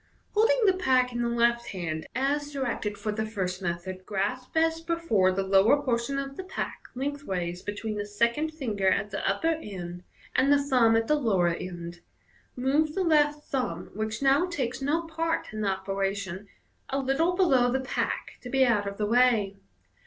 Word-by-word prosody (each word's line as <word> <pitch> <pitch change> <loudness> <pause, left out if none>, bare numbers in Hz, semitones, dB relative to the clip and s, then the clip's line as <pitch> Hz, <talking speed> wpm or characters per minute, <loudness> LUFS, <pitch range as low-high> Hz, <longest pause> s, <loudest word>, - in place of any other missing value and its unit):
— - - -39
Holding 475 +4 +4
the 385 - +5
pack 255 -8 +2
in 240 - -2
the 235 - 0
left 235 0 +2
hand, 165 -4 -4
as 290 +3 0
directed 240 -7 -2
for 215 - -2
the 215 +1 -2
first 190 -4 -3
method, 185 +1 -4
grasp 210 +9 -3
as 325 0 +2
before 330 - +2
the 195 +1 -1
lower 195 +8 +5
por 255 -5 +1
tion 275 +4 -3
of 275 0 -4
the 375 - -4
pack 370 - -5
length 285 +2 -3
ways 180 -4 -3
between 210 +1 -4
the 205 - -2
second 235 +9 0
ringer 210 -8 -1
at 205 +2 +2
the - - -3
upper 320 +11 +1
end 180 - -7 0.3
and 275 - +4
the 285 - +7
thumb 250 -5 +3
at 225 0 +2
the 300 - +2
lower 210 -12 +2
end, 170 0 -6 0.6
move 290 +5 +1
the 385 - +1
left 300 -3 +3
thumb, 245 -11 -2
which 215 +4 -3
now 275 +6 +4
takes 270 -8 -3
no 300 +5 +1
part 325 -4 -2
in 215 - -4
the 205 - 0
operation, 195 0 -3 0.4
a 275 - -1
little 275 +6 +1
below 265 -10 +4
the 265 - +1
pack 260 - -3
to 250 - -8
be 265 +1 +4
out 210 -5 +2
of 200 0 -5
the 210 - 0
way. 225 -3 +3
235 Hz, 190 wpm, -27 LUFS, 200-285 Hz, 0.6 s, the